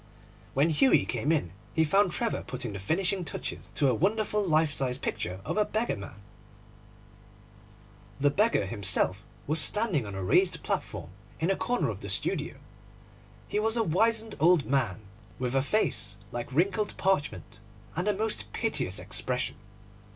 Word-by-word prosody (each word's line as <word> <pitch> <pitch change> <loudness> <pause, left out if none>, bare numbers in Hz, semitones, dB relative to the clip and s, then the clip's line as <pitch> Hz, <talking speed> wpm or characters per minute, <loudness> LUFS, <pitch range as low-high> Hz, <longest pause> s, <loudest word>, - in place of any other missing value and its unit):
When 145 +5 +3
Hughie 260 - +4
came 130 +5 -1
in 145 - 0 0.2
he 160 - +4
found 195 +5 +3
Trevor 230 +6 -1
putting 120 -4 -4
the 100 - -5
finishing 180 - +1
touches - - -6
to 140 - +3
a 130 - +3
wonderful 210 - +1
life 155 -4 +2
size 130 -3 +1
picture 90 -8 -3
of - - -2
a 210 - +5
beggar 220 +3 -1
man. 100 -1 -9 2.0
The 145 0 +3
beggar 215 - +2
himself 95 -1 +2 0.2
was 155 +2 +2
standing 195 - +1
on 100 - -6
a 95 - -4
raised 90 - +2
platform 80 - -3 0.3
in 165 +4 +1
a - - +2
corner 245 +4 0
of - - -5
the - - -6
studio. - - +1 0.9
He 210 - -1
was 225 +2 +1
a 230 - +3
wizened 220 +5 +2
old 170 -1 +4
man, 125 -8 0 0.4
with 125 -1 -2
a 135 - +3
face 125 - 0
like 120 +1 -5
wrinkled 190 +8 0
parchment, 145 - -1 0.4
and 180 +5 -2
a 210 - +3
most 220 +1 -2
piteous - - -1
expression. - - -3
160 Hz, 160 wpm, -28 LUFS, -, 2.0 s, a